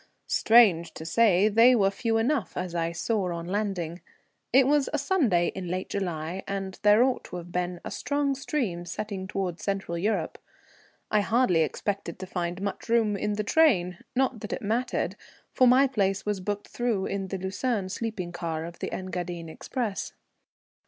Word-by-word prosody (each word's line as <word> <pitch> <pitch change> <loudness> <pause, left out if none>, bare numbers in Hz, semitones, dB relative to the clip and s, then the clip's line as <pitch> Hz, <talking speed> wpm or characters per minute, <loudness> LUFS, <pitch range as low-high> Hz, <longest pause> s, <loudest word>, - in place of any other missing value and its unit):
Strange 190 -8 +4
to 160 - -7
say, 200 +2 +4
they 230 +4 +6
were 195 -4 +3
few 225 +2 0
enough, 240 0 0
as 180 -1 -3
I 170 -1 -1
saw 185 +2 -1
on 170 -1 -4
landing. 180 -3 -2 0.5
It 265 0 +6
was 290 0 +2
a 300 - 0
Sunday 270 - +2
in 190 -2 -5
late 185 +2 -3
July, 175 -2 -3
and 195 -1 -4
there 210 +2 +6
ought 260 -1 0
to - - -8
have 175 0 -7
been 180 0 -2
a - - -5
strong 285 -1 0
stream 255 - -2
setting 195 0 -5
towards 190 -3 -3
Central 195 -4 -2
Europe. 210 +5 -1 0.7
I 215 - +4
hardly 220 -6 +3
expected 180 +3 -2
to 190 - -6
find 180 0 -3
much 200 +3 -4
room 225 -3 +3
in 210 +1 -1
the 210 +1 -1
train; 200 - +3 0.2
not 260 -2 +1
that 210 - -5
it - - -5
mattered, 235 +4 -1 0.4
for 255 - +4
my 255 +3 +6
place 200 -7 0
was 210 -2 -1
booked 205 +2 -4
through 235 -6 -1
in 195 -1 -3
the 195 - -3
Lucerne 190 +2 -2
sleeping 195 -3 -4
car 165 -2 -3
of 170 0 -9
the - - -4
Engadine 175 -2 -4
express. 220 +4 -4
195 Hz, 175 wpm, -27 LUFS, 175-230 Hz, 0.7 s, they